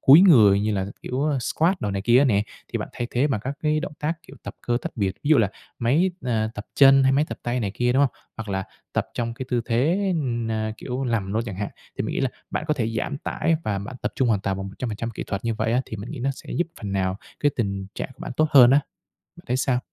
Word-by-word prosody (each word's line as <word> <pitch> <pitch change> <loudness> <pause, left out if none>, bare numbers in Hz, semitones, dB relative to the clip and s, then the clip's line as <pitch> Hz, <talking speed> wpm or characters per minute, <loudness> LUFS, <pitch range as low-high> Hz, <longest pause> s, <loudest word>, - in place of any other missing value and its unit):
cúi 145 +6 +9
người 110 - +7
như 105 +1 0
là, 95 -1 -1 0.2
kiểu, 130 +4 -2
a, 145 -3 +1
squad 165 +8 +2
đồ 105 - -1
này 100 0 -2
kia 120 +3 +5
á 140 - +5
nè, 105 -5 +3 0.3
thì - - 0
bạn - - -4
thay 120 - -3
thế 130 +4 +2
bằng 115 -8 -1
các 135 +2 -2
cái 155 0 +2
động 165 - -5
tác, 150 +2 0
kiểu, 135 - -13
tập - - -7
cơ 120 0 0
tách - - -4
biệt. 100 -3 0
Ví 150 - -1
dụ 155 - +7
là 105 -4 +3 0.3
máy, 150 +11 +3
à, 110 -3 +1
tập 105 - -7
chân 135 -1 +7
hay 135 0 +4
máy 145 +3 +3
tập - - -6
tay 120 +1 -1
này 100 -3 -1
kia, 125 0 +1
đúng 135 +2 +4
không? 125 - -9 0.2
Hoặc 110 -2 -6
là 95 -1 -1 0.3
tập - - 0
trong 115 -1 -2
cái 130 +1 -6
tư 120 -2 +2
thế, 165 - +1
na, 115 -5 -1
kiểu, 130 +1 -4
nằm 105 -5 -1
luôn 110 +2 +1
chẳng 100 -4 -5
hạn, 100 0 -2 0.3
thì - - +1
mình - - -3
nghĩ - - -1
là - - +1 0.2
bạn - - -2
có 150 - +3
thể 115 -6 -1
giảm 140 - -2
tải 160 +1 0
và 100 -2 0
bạn 120 +6 -7
tập - - -1
trung 130 -3 +2
hoàn 105 -4 +2
toàn 100 -1 -1
bằng 95 0 -5
100% 115 +2 -4
kỹ 115 - -5
thuật 100 +1 -4
như 115 -1 0
vậy 110 +1 0
á, 125 - +3
thì 110 - -6
mình 105 +4 -7
nghĩ 150 - -6
nó 135 +3 0
sẽ - - -9
giúp 175 - 0
phần 100 -2 -4
nào 95 -1 0 0.2
cái 145 - +4
tình 100 -4 -2
trạng - - -4
của 130 - -29
bạn - - -5
tốt 155 - +4
hơn 125 -4 +8
á. 140 +2 +6 0.6
Bạn 170 - -15
thấy 125 - +1
sao? 130 -1 +1
120 Hz, 285 wpm, -24 LUFS, 105-140 Hz, 0.6 s, cúi